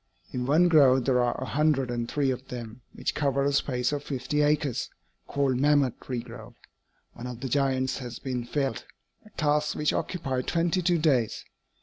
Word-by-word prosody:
In 125 Hz, 0 st, -3 dB
one 160 Hz, +5 st, +5 dB
grove 135 Hz, -6 st, +5 dB
there 125 Hz, -2 st, +3 dB
are 120 Hz, 0 st, 0 dB
a 130 Hz, -, -3 dB
hundred 140 Hz, -3 st, +1 dB
and 120 Hz, -1 st, -3 dB
three 140 Hz, -3 st, +1 dB
of 130 Hz, +1 st, -6 dB
them, 120 Hz, -1 st, -7 dB
which -, -, -3 dB
cover 140 Hz, -2 st, +1 dB
a 140 Hz, -, +2 dB
space 125 Hz, -2 st, 0 dB
of 145 Hz, -1 st, -3 dB
fifty 145 Hz, +2 st, -1 dB
acres, 145 Hz, -3 st, +1 dB, 0.4 s
called 140 Hz, -3 st, +1 dB
'Mammoth 145 Hz, -2 st, +2 dB
Tree 125 Hz, -3 st, -4 dB
Grove.' 115 Hz, 0 st, -11 dB, 0.6 s
One 120 Hz, -, -7 dB
of 125 Hz, -1 st, -7 dB
the 135 Hz, -, -2 dB
giants 130 Hz, 0 st, 0 dB
has 120 Hz, -3 st, -7 dB
been 125 Hz, -2 st, -3 dB
felled 135 Hz, +2 st, -2 dB, 0.4 s
a 215 Hz, -, -17 dB
task 150 Hz, -1 st, +1 dB
which 150 Hz, -, +1 dB
occupied 130 Hz, -8 st, -2 dB
twenty 170 Hz, +2 st, +1 dB
two 175 Hz, 0 st, +2 dB
days. 135 Hz, -9 st, +1 dB
135 Hz, 185 wpm, -27 LUFS, 125-150 Hz, 0.6 s, one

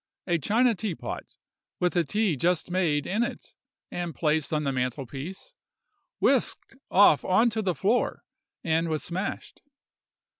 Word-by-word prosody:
A 175 Hz, -2 st, +1 dB
china 230 Hz, -, +3 dB
teapot, 200 Hz, -4 st, -5 dB, 0.4 s
with 180 Hz, 0 st, +1 dB
the 175 Hz, -, +2 dB
tea 205 Hz, +2 st, 0 dB
just 175 Hz, +5 st, 0 dB
made 165 Hz, -6 st, +1 dB
in 210 Hz, +5 st, 0 dB
it, 240 Hz, -, -4 dB, 0.4 s
and 175 Hz, -2 st, -4 dB
placed 155 Hz, -1 st, 0 dB
on 150 Hz, -1 st, 0 dB
the 140 Hz, -, 0 dB
mantel 130 Hz, +1 st, -2 dB
piece, 165 Hz, -, -8 dB, 0.7 s
whisked -, -, +1 dB
off 185 Hz, -6 st, +6 dB
on 225 Hz, +6 st, +3 dB
to 220 Hz, +1 st, -1 dB
the 185 Hz, -4 st, 0 dB
floor, 210 Hz, -, 0 dB, 0.4 s
and 165 Hz, 0 st, +1 dB
was 155 Hz, -1 st, -1 dB
smashed. 185 Hz, +4 st, -5 dB
175 Hz, 145 wpm, -27 LUFS, 155-205 Hz, 0.7 s, off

